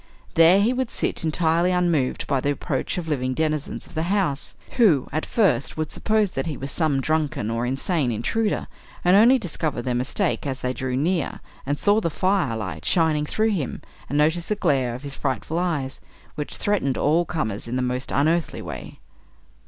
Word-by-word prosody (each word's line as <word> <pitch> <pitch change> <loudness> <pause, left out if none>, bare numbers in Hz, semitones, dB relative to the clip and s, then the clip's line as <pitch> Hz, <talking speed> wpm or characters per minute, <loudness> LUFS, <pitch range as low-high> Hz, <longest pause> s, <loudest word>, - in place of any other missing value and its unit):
There 165 +4 +6
he 220 +5 +3
would 255 -1 -1
sit - - -2
entirely 165 +2 +2
unmoved 170 -7 +1
by 140 -2 +1
the 140 - 0
approach 145 - -2
of 175 -2 -4
living 130 -4 -1
denizens 155 -1 -2
of - - -16
the 160 - -1
house, 190 -9 0 0.2
who, 180 - +4
at 155 +3 -2
first, 180 - +1
would 155 -1 -2
suppose 215 -3 +1
that - - -3
he 150 - -3
was 135 +1 -4
some 150 -4 +2
drunken 150 -7 -1
or 115 +1 -1
insane 135 +1 0
intruder, 205 - -1 0.4
and 180 +2 +6
only 235 +6 +7
discover 160 - -3
their 125 +1 -2
mistake 140 - 0
as 130 -2 -3
they 125 0 -1
drew 130 -1 -2
near, 165 +3 0 0.3
and 145 +1 0
saw 205 +5 +3
the 170 - 0
fire 185 - +1
light 85 -8 -5
shining 155 -3 +2
through 220 +5 +1
him, 165 -11 -3 0.3
and 145 - -1
notice 160 +3 +2
the 210 - 0
glare 135 - +1
of 130 - -9
his 140 -1 -6
frightful 135 +5 -2
eyes, 150 -7 -2 0.3
which 150 -1 -4
threatened 185 -11 0
all 160 +4 +3
comers 115 -13 -3
in 120 +2 -2
a 130 - 0
most 125 +1 -2
unearthly 160 +4 +1
way. - - -8
155 Hz, 190 wpm, -24 LUFS, 130-180 Hz, 0.4 s, only